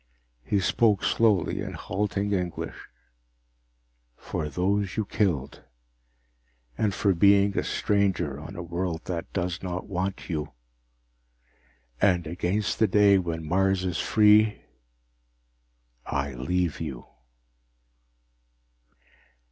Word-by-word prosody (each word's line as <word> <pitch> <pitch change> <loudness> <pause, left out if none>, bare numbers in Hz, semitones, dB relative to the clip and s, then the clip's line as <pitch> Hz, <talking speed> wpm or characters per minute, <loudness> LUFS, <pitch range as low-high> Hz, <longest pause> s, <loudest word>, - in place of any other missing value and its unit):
He 100 +10 0
spoke 105 +1 +2
slowly, 105 -7 +2
in - - -5
halting 100 +1 -2
English: 90 -3 -4 1.3
"For 75 - -4
those 95 +4 -1
you 110 - 0
killed, 85 -11 -1 1.1
and 105 - +1
for 100 0 +1
being 100 +2 +4
a - - +1
stranger 95 -9 0
on 80 +6 -9
a 90 - -5
world 85 -1 -3
that 85 -2 -4
does 90 -2 -2
not 90 -1 -4
want 95 0 -3
you, 75 -4 -4 1.5
and 90 -4 +3
against 90 +3 -2
the 110 - +4
day 100 0 +5
when 80 -3 -4
Mars 95 +1 +1
is 90 -2 -2
free, 105 0 +4 1.4
I 70 -1 -2
leave 85 +7 -1
you." 65 -7 -6
90 Hz, 105 wpm, -26 LUFS, 85-100 Hz, 1.5 s, day